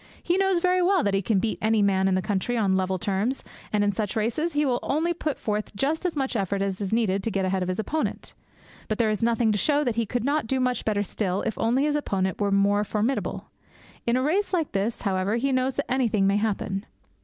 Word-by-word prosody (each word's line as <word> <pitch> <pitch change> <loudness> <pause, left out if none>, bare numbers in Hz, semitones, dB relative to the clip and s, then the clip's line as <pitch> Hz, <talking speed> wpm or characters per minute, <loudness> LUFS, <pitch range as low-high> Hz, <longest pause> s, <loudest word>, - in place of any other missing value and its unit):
He 350 - +1
knows 385 -1 +2
very 365 +1 +2
well 365 -2 +3
that 200 - +1
he 195 - +2
can 205 +2 +1
beat 220 +3 -1
any 220 -1 +3
man 190 -1 +2
in 190 - +2
the 185 - 0
country 210 +4 -1
on 195 -4 +2
level 190 0 0
terms, 200 +8 -1 0.3
and 210 -1 +2
in 205 - +2
such 205 +2 -3
races 240 +10 0
he 295 +1 +2
will 250 -3 +1
only 325 +4 0
put 310 -3 -3
forth 210 -1 -3
just 310 - 0
as 345 - -4
much 270 -3 -1
effort 195 -1 0
as 195 0 -3
is 195 - -2
needed 215 -4 +1
to 225 - -1
get 195 -2 -1
ahead 190 0 0
of 180 - -1
his 185 - -2
opponent. 305 +8 -3 0.5
But 215 - -1
there 225 -3 +2
is 210 - -2
nothing 230 -1 +2
to 205 - 0
show 295 +3 +2
that 240 -5 -1
he 230 -2 0
could 245 +1 -2
not 285 -2 0
do 265 +2 0
much 250 -2 0
better 205 -2 +1
still 195 -2 -2
if 220 - -2
only 245 +4 +2
his 295 0 +1
opponent 190 - -1
were 205 - +2
more 200 +1 +3
formidable. 215 +5 -2 0.6
In 235 +1 +3
a 255 - 0
race 375 +8 0
like 330 -5 0
this, 205 +4 -2
however, 195 0 0
he 270 +4 0
knows 260 0 +1
that 280 - -3
anything 230 -6 +2
may 200 +1 +3
happen. 205 -1 -2
220 Hz, 245 wpm, -25 LUFS, 200-270 Hz, 0.6 s, well